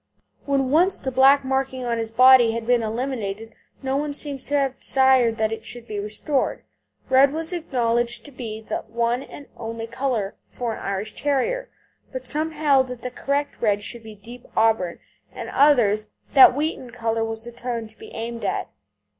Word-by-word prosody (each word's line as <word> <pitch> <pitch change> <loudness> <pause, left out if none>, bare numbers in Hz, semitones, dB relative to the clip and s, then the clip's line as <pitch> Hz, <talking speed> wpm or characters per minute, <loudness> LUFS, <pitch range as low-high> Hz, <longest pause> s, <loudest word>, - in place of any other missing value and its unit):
When 270 -2 +1
once 355 +6 +4
the 265 - -3
black 270 +2 +5
marking 265 -1 -1
on 235 -1 -1
his 225 -1 -3
body 250 0 +6
had 230 0 -4
been 245 0 +3
eliminated 225 -2 -4 0.3
no 265 0 -1
one 290 0 -2
seems 285 -2 -1
to 290 - 0
have 270 -2 -1
desired 260 -4 +3
that 220 -1 0
it 225 - -5
should 240 -1 -6
be 210 -1 -4
restored. 215 +7 -2 0.4
Red 265 +1 +5
was 325 +3 -2
acknowledged 240 -7 -1
to 290 - -10
be 225 -4 -7
the 220 - -3
one 235 +2 0
and 285 +1 -11
only 225 0 -5
colour 235 -4 -2
for 240 -2 -4
an - - -7
Irish 200 +2 -4
Terrier. - - -1 0.4
But - - -6
some 310 +1 0
held 290 -4 +2
that 250 -1 -8
the 250 - -4
correct 280 +3 -2
red 205 -2 +1
should 235 +2 -5
be 220 -1 -11
deep 235 +4 -13
auburn, 220 -6 +2 0.3
and - - -7
others 220 -8 +4 0.2
that 265 -2 +8
wheaten 290 -3 -2
colour 230 -1 -1
was 225 0 -4
the 240 - -8
tone 235 -1 -4
to 220 - -21
be - - -11
aimed 230 +1 -5
at. - - -2
245 Hz, 185 wpm, -23 LUFS, 225-275 Hz, 0.4 s, that